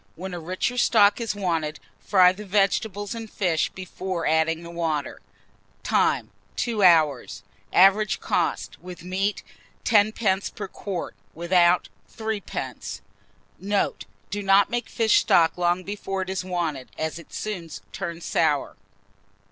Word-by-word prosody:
When 185 +2 -6
a 175 - -4
richer 185 +9 -2
stock 210 -2 +4
is 225 -2 -2
wanted, 165 -6 -2 0.2
fry 180 - +5
the 195 +3 -8
vegetables 205 +1 0
and 225 -1 -7
fish 175 -7 0
before 185 -2 -5
adding 160 +1 +1
the 170 - -9
water. 160 -4 -2 0.6
Time. - - +1 0.2
2 230 -4 -1
hours. 155 - +3 0.3
Average 195 +3 +4
cost, 145 - -1
with 180 -1 -10
meat, 195 +3 -1 0.4
10d. 210 -2 +2
per 200 - -5
quart; 190 -2 -5 0.2
without, 175 +1 +3 0.2
3d. 220 -2 -5 0.6
Note. 200 +1 -1 0.3
Do 205 +1 -2
not 195 0 +4
make 240 -1 -2
fish 225 -2 +3
stock 165 -2 +3
long 175 +1 +1
before 195 -1 -4
it 185 - -5
is 190 -1 -2
wanted, 170 -7 -3
as 160 +1 -3
it 170 - -15
soon 185 -6 -5 0.2
turns 170 -3 -5
sour. 150 -4 0
185 Hz, 130 wpm, -25 LUFS, 170-205 Hz, 0.6 s, fry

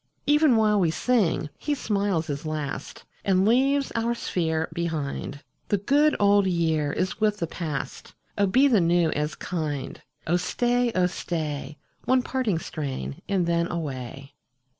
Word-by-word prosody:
37 295 - +4
Even 295 -5 +5
while 210 -2 +3
we 175 -4 +3
sing 195 -4 +1
he 295 -1 -1
smiles 200 - 0
his 145 -2 -4
last 155 -3 -5 0.2
And 190 -1 +3
leaves 270 +5 +3
our 230 +1 0
sphere 160 -7 -1
behind. 150 -4 -3 0.2
The 205 - +2
good 290 +10 +3
old 200 -1 +4
year 160 -4 +1
is 185 +5 -2
with 210 -1 +2
the 170 - -1
past; 155 -4 -5 0.2
Oh 200 -1 +2
be 260 +9 +5
the 225 -8 +4
new 170 -1 +3
as 150 +1 -2
kind! 150 -6 -4 0.2
Oh 175 +3 +2
staj, 240 +6 0
oh 185 -1 +3
stay, 155 -5 -4 0.3
One 255 -1 +3
parting 250 -10 0
strain, 135 - -5
and 190 -3 +1
then 170 0 +1
away. 135 -4 -5
175 Hz, 155 wpm, -25 LUFS, 155-220 Hz, 0.3 s, Even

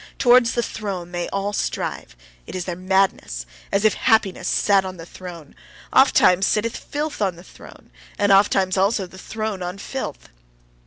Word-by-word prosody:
Towards 245 -1 +5
the 240 - 0
throne 190 -7 -5
they 175 -1 -3
all 200 +1 -2
strive: - - -3 0.3
it - - -8
is 180 -1 -3
their 180 - -3
madness 185 - 0 0.3
as 200 +2 +1
if 215 - +5
happiness 195 -5 +1
sat 200 -2 +3
on 185 -1 -7
the 165 - -9
throne! 175 -4 -10 0.4
Ofttimes 190 -8 +5
sitteth 225 +2 0
filth 295 -2 -4
on 190 -3 +1
the 175 - -13
throne. - - -15 0.3
and 205 0 +2
ofttimes 195 -1 +4
also 195 +1 +2
the 185 +1 -13
throne 215 -1 -4
on 180 +2 -4
filth. 200 - -6
195 Hz, 165 wpm, -22 LUFS, 180-215 Hz, 0.4 s, Towards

